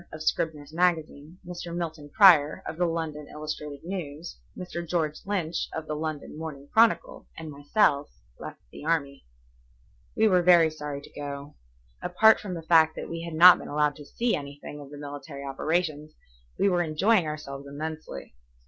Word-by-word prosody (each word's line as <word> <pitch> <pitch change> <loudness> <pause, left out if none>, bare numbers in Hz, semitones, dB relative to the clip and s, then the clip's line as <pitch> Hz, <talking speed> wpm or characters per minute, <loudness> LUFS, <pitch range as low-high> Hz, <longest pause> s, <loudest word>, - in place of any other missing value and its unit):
of 155 0 -7
Scribner's 155 -2 -2
Magazine, 165 -2 0
Mr. 175 -1 -6
Milton 160 -4 -5
Prior, 160 -5 +6
of 160 - -6
the 175 0 +2
London 160 -3 -4
Illustrated 150 -1 -6
News, 170 -3 -6 0.2
Mr. 180 -1 -5
George 160 -3 -1
Lynch, 175 -5 -2
of 160 - -4
the 155 - -4
London 155 -1 -5
Morning 145 -3 -7
Chronicle, 225 0 +2
and 160 -1 -7
myself 145 0 +1 0.3
left - - -8
the - - -11
army. 150 - -1 0.9
We 220 - +5
were 185 -3 +4
very 170 -2 +6
sorry 150 -2 -6
to - - -15
go. 140 0 -7 0.5
Apart 220 +5 +5
from 190 -3 -5
the 165 - -7
fact 160 -1 +5
that - - -6
we 165 0 -4
had 165 -1 -6
not 180 +3 +9
been - - -8
allowed 150 0 +1
to 145 - -11
see 235 +9 0
anything 145 0 -8
of 140 - -11
the 145 - -10
military 145 0 -8
operations, 155 +2 -2 0.4
we - - +3
were 180 -2 +2
enjoying 175 +3 +2
ourselves 140 -2 -6
immensely. 155 - -7
155 Hz, 165 wpm, -27 LUFS, 145-175 Hz, 0.9 s, not